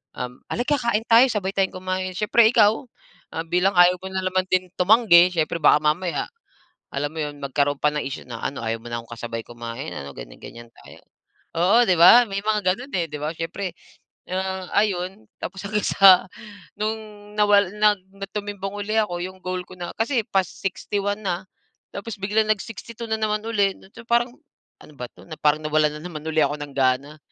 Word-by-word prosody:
al 125 0 -4
ah, - - -10
"Alika 280 +5 0
kain 235 -2 0
tayo. 235 +3 +7
Sabay 200 -4 -1
tayong 190 -1 0
kumain." 185 0 -3
Siyempre, 220 +2 +4
ikaw 220 +1 +4 0.7
bilang 180 +3 +3
ayaw 175 +1 +6
mo 190 - -6
na 190 0 -2
naman 185 0 0
din 185 0 +1
tumanggi. 180 -3 +6
Siyempre 165 0 0
baka 150 - +6
mamaya 170 +4 0 0.7
alam 145 +1 -1
mo - - -10
'yon, 145 -1 -6
magkaroon 140 +1 0
pa 150 - +4
ng 150 - -2
issue 135 - -5
na 115 -2 -6
ano, 140 - -3
"Ayaw 115 0 -2
mo 115 - -20
na 120 0 -3
akong 115 - -19
kasabay 115 -1 -5
kumain, 120 +5 -7
ano?" 70 0 -7
Ganyan-ganyan 115 - -11
tayo. - - -16 0.6
Oo,' 205 +8 +5
di 185 - +4
ba? 230 +8 +8
May 195 0 -2
mga 215 0 +1
gano'n, 250 +6 -10
eh, 170 -2 +1
'di - - -5
ba? 150 +2 -2
Siyempre, 175 +3 -4 0.6
ah, 190 0 -3
ayun 195 0 0 0.2
tapos 190 +1 -6
hanggang 210 0 -1
sa 190 -2 +7 0.5
nung 215 +1 0 0.4
nawala 205 -2 +4
nag 210 -1 +3 0.4
tumimbang 205 -1 -4
uli 205 +1 -3
ako. 175 -5 0
Yong 185 +1 -7
goal 185 0 -3
ko 185 - -12
na 175 - -5
kasi 235 +1 +1
pa-61 195 +2 -2
na, 185 -1 -2 0.5
tapos 210 +2 -5
biglang 215 +2 +1
nag-62 225 +2 -4
na 220 - 0
naman 215 0 0
uli. 200 -4 +1 0.2
So, 230 - -12
parang 240 +1 +1 0.5
ano 150 - -15
ba 125 - -4
'to? - - -18 0.2
Parang 150 0 +4
nawalan 150 0 +1
na - - -12
naman 155 -4 -7
ako 155 -2 +1
ng 145 -1 -6
gana. 135 +3 +1
185 Hz, 185 wpm, -23 LUFS, 155-210 Hz, 0.7 s, ba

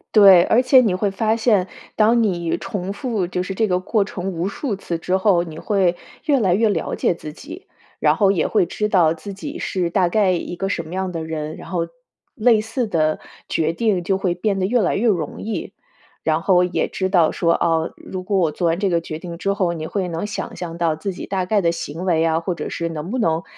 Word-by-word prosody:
对， 195 -4 +9
而 240 - +4
且 260 +1 +6
你 215 -7 +2
会 200 +1 0
发 220 +3 +1
现， 215 -5 +2 0.3
当 225 +2 +4
你 175 -5 0
重 195 -2 -4
复 220 -6 -2
就 180 0 -2
是 195 - -4
这 220 +3 +1
个 180 -2 +1
过 205 +1 +1
程 190 -1 -4
无 175 +2 -2
数 220 +3 -3
次 170 -3 -4
之 180 +3 0
后， 190 -3 +3
你 160 -2 -9
会 185 -4 +1 0.3
越 290 -3 +2
来 190 -6 +3
越 220 +2 +3
了 165 -6 -1
解 - - +1
自 155 -2 -9
己， 330 - -11 0.3
然 - - +3
后 200 -3 +4
也 170 -5 +1
会 205 -5 +2
知 210 +4 -2
道 175 -6 +3
自 195 +5 -8
己 290 - -7
是 180 -3 -1
大 180 0 +2
概 195 0 +2
一 175 0 -3
个 195 +3 -2
什 170 - -2
么 160 +3 -10
样 190 -1 -2
的 165 -2 -4
人， 155 -1 -5
然 - - -11
后 170 -2 -2 0.4
类 225 -1 +3
似 225 +2 -2
的 155 -4 +1 0.3
决 160 +1 0
定 195 -3 0
就 190 +1 +1
会 185 -2 0
变 195 +2 -1
得 185 - 0
越 245 +4 +2
来 180 - +1
越 220 - 0
容 170 -7 -2
易。 220 0 -4 0.5
然 160 0 +1
后 180 0 +4
也 180 - 0
知 190 -1 -2
道 175 -4 +4
说， 170 -1 +1
哦， 165 -1 +1
如 185 -1 -7
果 195 +1 0
我 165 -4 +2
做 175 - -3
完 165 +1 +1
这 200 -1 +1
个 170 -2 +1
决 155 -1 -6
定 170 -1 -7
之 195 +3 -1
后， 185 -4 0
你 160 -1 -5
会 190 +1 -2
能 165 +2 -3
想 210 - -5
象 170 -2 -6
到 165 -2 +1
自 190 +5 -4
己 - - -7
大 190 -2 -1
概 210 +2 +2
的 170 -2 +1
行 165 +2 -5
为 165 -3 +2
啊， 160 0 +2
或 170 +1 -3
者 155 - -5
是 170 - -3
能 165 +4 -5
不 255 - -1
能 165 -4 +1
185 Hz, 260 characters per minute, -21 LUFS, 170-205 Hz, 0.5 s, 对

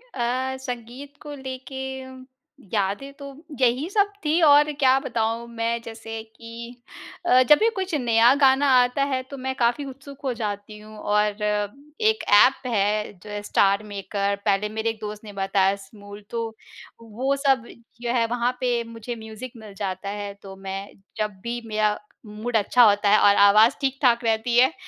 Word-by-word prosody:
अ, 260 +2 -1
संगीत 250 +2 -7
को 295 -1 -8
लेके 265 0 -7 0.9
यादें 205 +7 -1
तो, 280 -1 -10 0.3
यही 255 +7 +2
सब 405 0 +2
थीं। 315 +3 +2
और 295 0 +6
क्या 260 -1 +5
बताऊँ? 230 -1 -2
मैं 230 0 -2
जैसे 225 -1 -7
कि 230 +2 -11 0.5
अ, 255 -6 +6
जब 300 - +9
भी 450 - +4
कुछ 380 -2 -3
नया 235 -2 +4
गाना 270 +1 +5
आता 250 +3 +1
है, 270 -2 -1
तो 275 +2 -10
मैं 265 0 -3
काफ़ी 245 +4 +1
उत्सुक 275 +1 -11
हो 265 -2 -1
जाती 210 -2 -5
हूँ 215 0 -13
और 210 0 0 0.6
एक 440 0 +2
ऐप 255 +5 +5
है 210 -2 0
जो 210 - -11
है, 205 0 -4
स्टार 200 0 +2
मेकर 200 0 -2
पहले 205 0 +1
मेरे 220 +1 -2
एक 225 -1 -5
दोस्त 210 0 -7
बताया 195 0 +2
स्मूल, 205 +1 -13
तो 230 -1 -4 0.5
वो 240 +5 -2
सब 270 -4 +1 0.3
जो 240 -1 -1
है, 235 -2 +2
वहाँ 245 +1 0
पे 245 -2 0
मुझे 230 +1 -7
म्यूज़िक 220 +2 -9
मिल 215 -2 -11
जाता 195 0 -4
है, 205 0 -5
तो 195 -1 -10
मैं 195 +1 -6 0.3
जब 210 -3 -3
भी 240 0 -4
मेरा 215 -1 +1 0.3
मूड 215 +3 -5
अच्छा 240 +4 +4
होता 205 0 +2
है 210 - +6
और 200 0 +5
आवाज़ 215 +6 +6
ठीक-ठाक 265 -3 +2
रहती 225 +1 +1
है 260 +5 +5
230 Hz, 170 wpm, -24 LUFS, 210-260 Hz, 0.9 s, जब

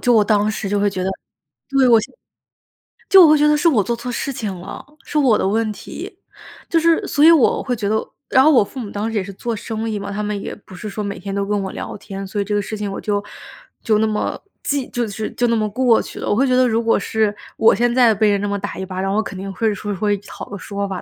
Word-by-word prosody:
就 245 - +3
我 215 -2 +5
当 210 0 +2
时 200 -1 -4
就 205 0 0
会 205 0 +2
觉 185 -1 -4
得 190 - 0 0.6
对 275 -2 +3
我 230 -2 +6
现 215 - -9 1.0
就 380 -2 +9
我 310 - +5
会 305 - +6
觉 300 +1 +4
得 300 - +4
是 335 - +2
我 220 -9 +2
做 235 +2 -1
错 245 +1 -6
事 275 +3 -3
情 210 -5 -4
了， 195 +7 -9 0.2
是 305 - -3
我 255 -7 +4
的 - - 0
问 220 +1 0
题。 - - -9 0.5
就 330 - +3
是 335 0 +2
所 290 - +2
以 330 - +9
我 315 -7 +4
会 250 - -1
觉 210 -3 -2
得， 220 - +2 0.3
然 260 - +5
后 310 - +6
我 255 -7 +5
父 255 +6 -9
母 220 - -5
当 210 +2 -2
时 220 - -2
也 195 - 0
是 200 +1 -8
做 235 +4 -4
生 225 +1 -4
意 210 -2 -2
嘛， 200 0 -6
他 210 +1 -3
们 210 -1 -2
也 - - -6
不 200 - -17
是 215 - -7
说 210 +1 -4
每 200 -2 -5
天 195 +1 -6
都 200 0 -1
跟 205 0 -1
我 190 - -4
聊 - - -6
天， 195 -1 -7
所 205 +2 -4
以 - - 0
这 205 +1 -1
个 205 - +1
事 215 +2 -5
情 205 -1 -3
我 - - -5
就 205 -1 -1 0.6
就 215 -2 +3
那 220 - +2
么 210 -1 -2 0.2
记 280 -3 -1
就 240 -1 -1
是， 215 +1 -4
就 245 - +1
那 230 - +2
么 215 -1 0
过 240 +1 +3
去 - - -10
了。 - - -3
我 - - +3
会 270 +4 +2
觉 255 - +2
得 255 0 +4
如 225 0 +1
果 230 - +3
是 215 -2 0 0.2
我 225 - +5
现 240 +3 +1
在 245 -3 +5
被 215 0 +3
人 200 - +2
那 205 - -1
么 200 0 -1
打 205 - -5
一 190 - -4
巴 185 0 -5
掌， 195 0 -1
我 215 - +2
肯 190 - -7
定 195 +1 -5
会 220 +2 0
说 205 +1 -4
会 205 +2 +1
讨 205 - -9
个 200 - -6
说 200 +1 -4
法 190 -2 -5
215 Hz, 315 characters per minute, -20 LUFS, 200-240 Hz, 1.0 s, 就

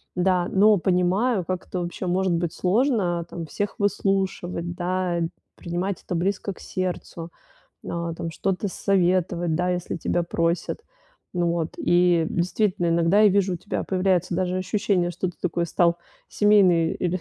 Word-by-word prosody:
Да, 180 -1 +2
но 205 +1 +5
понимаю, 185 +4 +1
как 185 -1 -4
это 185 - -3
вообще 175 +1 -4
может 185 0 +1
быть 170 -1 -1
сложно 190 -4 +1
там 170 -1 -6
всех 205 +6 -3
выслушивать, 190 -4 -1
да, 180 -1 -1 0.3
принимать 180 +2 -3
это 180 - -4
близко 195 +3 -1
к - - -18
сердцу, 175 -2 -5 0.5
н - - -7
а 170 -1 -3
там 165 0 -5
что-то 195 +4 -2
советовать, 180 -3 +1
да, 180 +2 0
если 180 -1 -2
тебя 175 +1 0
просят. 170 - -1 0.5
Ну 175 -1 +1
вот, 165 -1 -2
и 175 -2 +3
действительно, 180 0 0
иногда 170 +4 +3
я 215 - +7
вижу, 195 -2 +2
у - - -3
тебя 205 - -4
появляется 185 -2 +1
даже 185 0 0
ощущение, 185 -1 0
что 180 +2 -3
ты - - -22
такой 175 -1 -1
стал 170 +1 +2 0.3
семейный 185 -6 +4
или 180 0 -1
180 Hz, 155 wpm, -24 LUFS, 170-190 Hz, 0.5 s, я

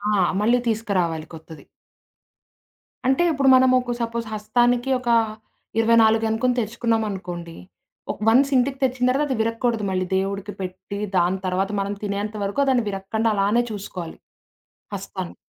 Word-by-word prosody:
ఆ! - - +2 0.2
మళ్ళీ 235 +4 +4
తీస్కరావాలి 185 -8 -1
కొత్తది. 160 -2 -11 1.4
అంటే, 265 +6 +3
ఇప్పుడు 275 -2 +2
మనమొక 255 -1 +3
సపోజ్ 230 0 -2
హస్తానికి 240 +4 +1
ఒక, 245 -1 -4 0.7
24 225 -1 +4
అనుకొని 245 +3 0
తెచ్చుకున్నామనుకోండి. 205 -7 -3 0.6
ఒక్ - - -10
వన్స్ 270 +5 +4
ఇంటికి 265 +2 0
తెచ్చిన 250 -1 +1
తర్వాత, 290 +3 +1
అది - - -6
విరక్కూడదు 230 0 -1
మళ్ళీ 185 0 0
దేవుడికి 200 +1 -3
పెట్టి, 190 +2 -6 0.2
దాని 180 +2 +2
తర్వాత 190 +2 0
మనం 200 +1 -3
తినేంత 205 +1 -3
వరకు 200 +8 -1
అ - - -5
దాన్ని 245 -4 +2
విరగకండా 205 +3 -1
అలానే 205 +4 +2
చూసుకోవాలి. 185 -5 -7 0.8
హస్తాన్ని. 190 -2 -6
220 Hz, 130 wpm, -23 LUFS, 195-240 Hz, 1.4 s, మళ్ళీ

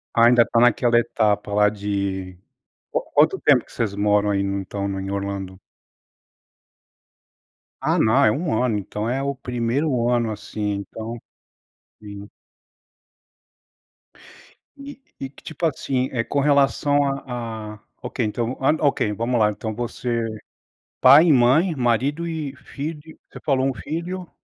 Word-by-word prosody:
Ah, 115 0 +6
ainda 120 0 +6
tá 115 - +1
naquela 120 0 +4
etapa 105 -3 0
lá 105 0 +4
de 100 -2 -3 0.6
quan - - -1
quanto - - +4
tempo - - +4
que - - -23
vocês 105 -4 -2
moram 105 0 +2
aí 100 -1 +1
no 100 0 -2
então 100 +1 -4
no 95 0 -3
em 95 0 -5
Orlando? 100 -1 -4 2.2
Ah, - - +1
não 110 0 +4
é 105 - +5
1 145 -4 -1
ano. 115 -4 +1
Então 105 +2 -4
é 135 +2 -1
o 140 0 -2
1° 125 +1 -1
ano 120 -2 +1
assim. 105 0 -4 0.2
Então 115 +1 -7 0.8
sim. 100 0 -10 2.5
E 280 0 -10 0.2
e 135 - -5
que 140 - -19
tipo, 160 +2 -4
assim, 130 -3 -1
eh, 115 -3 -1
com 140 - -2
relação 145 0 +3 0.2
à 115 -3 -5
à - - -18 0.2
ok, 125 0 -3
então 115 +3 -2
v - - -22
hã, 150 +4 +3
ok, 140 -7 +1
vamos 115 +3 -1
lá 105 0 +3
então 110 +1 -5
você 120 0 -3 0.7
pai 140 +6 +8
e 155 - +6
mãe, 140 +8 +3
marido 135 +7 0
e 155 -4 -4
filho 150 +4 -8
você - - -11
falou 135 -3 +1
1 135 - -1
filho? 175 +6 -5
120 Hz, 150 wpm, -22 LUFS, 105-140 Hz, 2.5 s, pai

